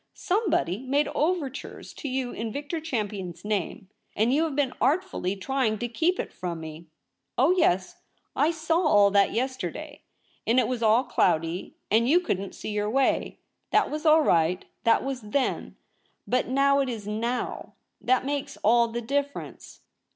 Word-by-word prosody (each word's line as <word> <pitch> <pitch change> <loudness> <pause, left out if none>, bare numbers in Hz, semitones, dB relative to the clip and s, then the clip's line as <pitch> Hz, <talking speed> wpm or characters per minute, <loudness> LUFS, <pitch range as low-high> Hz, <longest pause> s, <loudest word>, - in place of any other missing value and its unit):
Somebody 355 - 0
made 275 +3 +1
overtures 300 -4 -3
to 290 - -6
you 255 -1 -2
in 225 0 -4
Victor 290 +6 -4
Champion's 205 - -4
name, 200 -2 -2 0.3
and 225 +4 +2
you 310 +4 +3
have 305 -4 -4
been 280 -3 +1
artfully 310 - 0
trying 225 +1 0
to 240 - -3
keep 325 +10 0
it - - -4
from 175 -2 -5
me. 160 +1 -9 0.5
Oh 270 +7 +4
yes, 190 - +1 0.4
I 300 - +3
saw 325 0 0
all 205 - +5
that 200 -1 +4
yesterday; 260 +3 -4 0.5
and 235 +3 +4
it 240 - +2
was 250 -2 -2
all 225 +2 +4
cloudy, 165 - 0 0.2
and 230 +3 +3
you 340 +5 +6
couldn't 200 - -3
see - - -6
your 210 0 -1
way. 270 +4 +1 0.3
That - - +2
was 305 +1 -4
all 315 0 +6
right. 170 - +2 0.2
That 230 - +4
was 270 -1 -3
Then; 225 +6 -2 0.5
but 250 0 0
now 275 +2 +3
it 270 -2 0
is 220 -4 -5
Now. 235 +4 -3 0.3
That 255 0 +2
makes 285 0 -3
all 235 +2 +5
the 235 +1 -4
difference.' 280 +4 -4
250 Hz, 165 wpm, -26 LUFS, 210-285 Hz, 0.5 s, you